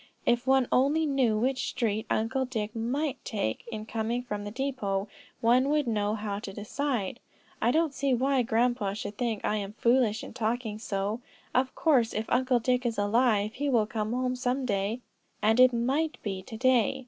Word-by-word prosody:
"If 240 Hz, +1 st, +2 dB
one 265 Hz, -2 st, +4 dB
only 290 Hz, +5 st, +3 dB
knew 260 Hz, -7 st, +2 dB
which 255 Hz, +4 st, 0 dB
street 220 Hz, -3 st, -1 dB
Uncle 225 Hz, +5 st, 0 dB
Dick 220 Hz, -4 st, -4 dB
might 265 Hz, +6 st, -2 dB
take 155 Hz, -, -2 dB
in 215 Hz, -1 st, -5 dB
coming 230 Hz, +2 st, -2 dB
from 210 Hz, -4 st, -5 dB
the -, -, -4 dB
depot, 215 Hz, -5 st, -2 dB, 0.3 s
one 250 Hz, +4 st, +4 dB
would 300 Hz, -1 st, +2 dB
know 210 Hz, -2 st, 0 dB
how 205 Hz, -2 st, -3 dB
to 205 Hz, -, -7 dB
decide. 230 Hz, +2 st, -3 dB, 0.4 s
I 230 Hz, -, +3 dB
don't 315 Hz, +2 st, +2 dB
see 275 Hz, 0 st, 0 dB
why 265 Hz, +2 st, +2 dB
grandpa 235 Hz, -3 st, +1 dB
should 210 Hz, 0 st, -5 dB
think 230 Hz, -4 st, -1 dB
I 210 Hz, -, +1 dB
am 200 Hz, 0 st, -4 dB
foolish 235 Hz, -2 st, +2 dB
in -, -, -9 dB
talking 225 Hz, -2 st, -2 dB
so; 205 Hz, +2 st, -2 dB, 0.3 s
of 255 Hz, 0 st, +1 dB
course 255 Hz, -8 st, +2 dB
if 215 Hz, -, -1 dB
Uncle 255 Hz, 0 st, +3 dB
Dick 250 Hz, +2 st, +1 dB
is 235 Hz, -2 st, -1 dB
alive, 210 Hz, 0 st, +2 dB
he 285 Hz, +3 st, -2 dB
will 235 Hz, -5 st, +3 dB
come 215 Hz, 0 st, -3 dB
home 250 Hz, +1 st, 0 dB
some 255 Hz, +1 st, -1 dB
day, 205 Hz, +2 st, -1 dB, 0.4 s
and 220 Hz, +3 st, +3 dB
it 255 Hz, 0 st, +8 dB
might 270 Hz, +7 st, 0 dB
be 195 Hz, -3 st, -3 dB
to 220 Hz, +4 st, -9 dB
day. 255 Hz, -1 st, +3 dB
235 Hz, 185 wpm, -28 LUFS, 215-255 Hz, 0.4 s, it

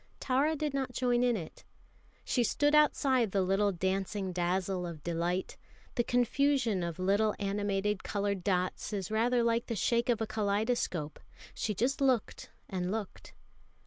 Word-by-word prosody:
Tara 280 Hz, +5 st, +1 dB
did 300 Hz, -1 st, -2 dB
not 265 Hz, -2 st, -2 dB
join 245 Hz, -1 st, +1 dB
in 245 Hz, -2 st, +2 dB
it. 165 Hz, -5 st, -9 dB, 0.6 s
She 245 Hz, -, +1 dB
stood 290 Hz, +6 st, +2 dB
outside 275 Hz, -5 st, +3 dB
the 195 Hz, 0 st, +1 dB
little 195 Hz, +2 st, +2 dB
dancing 190 Hz, +1 st, -2 dB
dazzle 180 Hz, +1 st, -1 dB
of 160 Hz, -3 st, -8 dB
delight 175 Hz, +2 st, -2 dB, 0.4 s
the 240 Hz, -, +1 dB
confusion 245 Hz, -3 st, +1 dB
of 170 Hz, -2 st, -3 dB
little 200 Hz, +3 st, +2 dB
animated 205 Hz, 0 st, -1 dB
coloured 200 Hz, -2 st, -2 dB
dots 185 Hz, +2 st, -1 dB
is 195 Hz, -1 st, -3 dB
rather 235 Hz, +2 st, +2 dB
like 230 Hz, 0 st, +1 dB
the 230 Hz, -, -2 dB
shake 235 Hz, +4 st, +1 dB
of 235 Hz, -, +2 dB
a 220 Hz, -, 0 dB
kaleidoscope 210 Hz, -6 st, -1 dB
and -, -, -20 dB
she 210 Hz, -, -2 dB
just 255 Hz, +8 st, 0 dB
looked 260 Hz, -5 st, 0 dB, 0.2 s
and 180 Hz, -1 st, -3 dB
looked. 215 Hz, -2 st, -6 dB
210 Hz, 155 wpm, -31 LUFS, 190-245 Hz, 0.6 s, outside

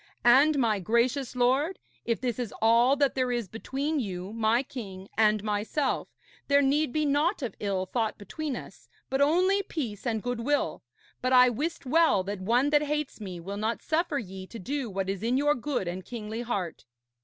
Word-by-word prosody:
And, 280 Hz, +5 st, +6 dB
my 225 Hz, -6 st, +2 dB
gracious 235 Hz, +7 st, 0 dB
lord, 265 Hz, +9 st, +2 dB, 0.3 s
if 230 Hz, -1 st, 0 dB
this 245 Hz, -2 st, -2 dB
is 235 Hz, -4 st, -3 dB
all 235 Hz, +4 st, +5 dB
that 280 Hz, -1 st, +2 dB
there 255 Hz, -1 st, 0 dB
is 240 Hz, -4 st, -1 dB
between 275 Hz, -, -2 dB
you, 190 Hz, -3 st, -4 dB
my 225 Hz, +2 st, +2 dB
king, 195 Hz, -8 st, -8 dB
and 215 Hz, -1 st, +3 dB
myself, 215 Hz, +7 st, -1 dB, 0.4 s
there 280 Hz, 0 st, +4 dB
need 285 Hz, +1 st, +2 dB
be 305 Hz, +2 st, 0 dB
naught 295 Hz, +4 st, +1 dB
of 245 Hz, -, -3 dB
ill 195 Hz, -2 st, -1 dB
thought 220 Hz, +3 st, -1 dB
between 275 Hz, +8 st, -4 dB
us, -, -, -10 dB, 0.2 s
but 270 Hz, +1 st, +1 dB
only 365 Hz, +7 st, +3 dB
peace 250 Hz, -, -5 dB
and 220 Hz, -3 st, -1 dB
goodwill. 245 Hz, +4 st, -1 dB, 0.4 s
But 255 Hz, 0 st, +1 dB
I 250 Hz, 0 st, +8 dB
wist 290 Hz, +7 st, -3 dB
well 310 Hz, -, +4 dB
that 200 Hz, 0 st, -5 dB
one 245 Hz, +8 st, +2 dB
that 295 Hz, -1 st, +5 dB
hates 300 Hz, -4 st, -3 dB
me 185 Hz, -4 st, -6 dB
will 195 Hz, +4 st, -6 dB
not 220 Hz, +2 st, -2 dB
suffer 320 Hz, -2 st, 0 dB
ye 190 Hz, -5 st, -6 dB
to 230 Hz, -, -9 dB
do 265 Hz, +4 st, -3 dB
what 195 Hz, -1 st, -3 dB
is 195 Hz, -1 st, -3 dB
in 240 Hz, +3 st, +1 dB
your 295 Hz, +1 st, +3 dB
good 255 Hz, -7 st, -2 dB
and 180 Hz, +2 st, -4 dB
kingly 220 Hz, 0 st, -5 dB
heart.' 195 Hz, -, -4 dB
245 Hz, 190 wpm, -28 LUFS, 210-285 Hz, 0.4 s, I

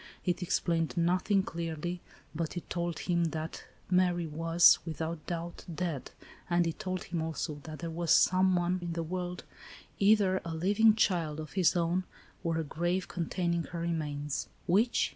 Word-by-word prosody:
It 180 Hz, +1 st, 0 dB
explained 170 Hz, -1 st, 0 dB
nothing 185 Hz, +3 st, +2 dB
clearly, 170 Hz, +1 st, -4 dB, 0.3 s
but 165 Hz, +2 st, -3 dB
it 175 Hz, -, -6 dB
tbld 170 Hz, -2 st, -2 dB
him 170 Hz, -1 st, +2 dB
that 160 Hz, 0 st, -4 dB, 0.3 s
Mary 180 Hz, -2 st, +3 dB
was, 165 Hz, +2 st, +5 dB
without 160 Hz, -1 st, -4 dB
doubt, 170 Hz, 0 st, -4 dB
dead, 165 Hz, -5 st, -3 dB, 0.4 s
and 175 Hz, 0 st, +3 dB
it 165 Hz, -, -3 dB
told 185 Hz, -3 st, -3 dB
him 170 Hz, -2 st, -3 dB
also 160 Hz, -1 st, -3 dB
that 155 Hz, -1 st, -7 dB
there 165 Hz, 0 st, -5 dB
was, 170 Hz, 0 st, -3 dB
somewhere 185 Hz, 0 st, +4 dB
in 170 Hz, -1 st, -3 dB
the 165 Hz, 0 st, -2 dB
world, 180 Hz, +1 st, -4 dB, 0.6 s
either 200 Hz, -2 st, +4 dB
a 165 Hz, -1 st, -4 dB
living 205 Hz, +6 st, +4 dB
child 170 Hz, -8 st, +1 dB
of 155 Hz, -1 st, -7 dB
his 185 Hz, -3 st, +3 dB
own, 175 Hz, +2 st, +1 dB, 0.4 s
or 165 Hz, -2 st, 0 dB
a 165 Hz, -, 0 dB
grave 175 Hz, +4 st, -1 dB
containing 170 Hz, 0 st, -1 dB
her 170 Hz, -, -6 dB
remains. 150 Hz, -4 st, -2 dB, 0.2 s
Which 210 Hz, +7 st, +3 dB
170 Hz, 160 wpm, -31 LUFS, 165-180 Hz, 0.6 s, was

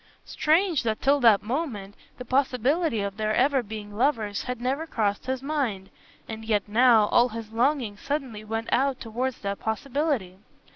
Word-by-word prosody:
Strange, 330 Hz, 0 st, +2 dB
that 220 Hz, -2 st, -1 dB
till 280 Hz, +1 st, +3 dB
that 225 Hz, -6 st, +5 dB
moment 225 Hz, -5 st, -3 dB, 0.2 s
the 250 Hz, -, -8 dB
possibility 260 Hz, -, +1 dB
of 200 Hz, 0 st, -4 dB
their 215 Hz, 0 st, 0 dB
ever 270 Hz, +1 st, +3 dB
being 210 Hz, -2 st, -8 dB
lovers 220 Hz, -5 st, 0 dB
had 250 Hz, -2 st, -4 dB
never 270 Hz, +6 st, -2 dB
crossed 210 Hz, -3 st, -1 dB
his 260 Hz, 0 st, -2 dB
mind, 255 Hz, -10 st, -2 dB, 0.4 s
and 220 Hz, 0 st, -7 dB
yet 215 Hz, -2 st, 0 dB
now, 225 Hz, 0 st, +5 dB
all 240 Hz, +1 st, +4 dB
his 225 Hz, -1 st, -7 dB
longing 240 Hz, -2 st, 0 dB
suddenly 255 Hz, -3 st, -4 dB
went 225 Hz, +1 st, -4 dB
out 270 Hz, 0 st, +1 dB
towards 245 Hz, +3 st, -3 dB
that 200 Hz, -1 st, -3 dB
possibility. 235 Hz, -, -2 dB
235 Hz, 160 wpm, -26 LUFS, 215-275 Hz, 0.4 s, that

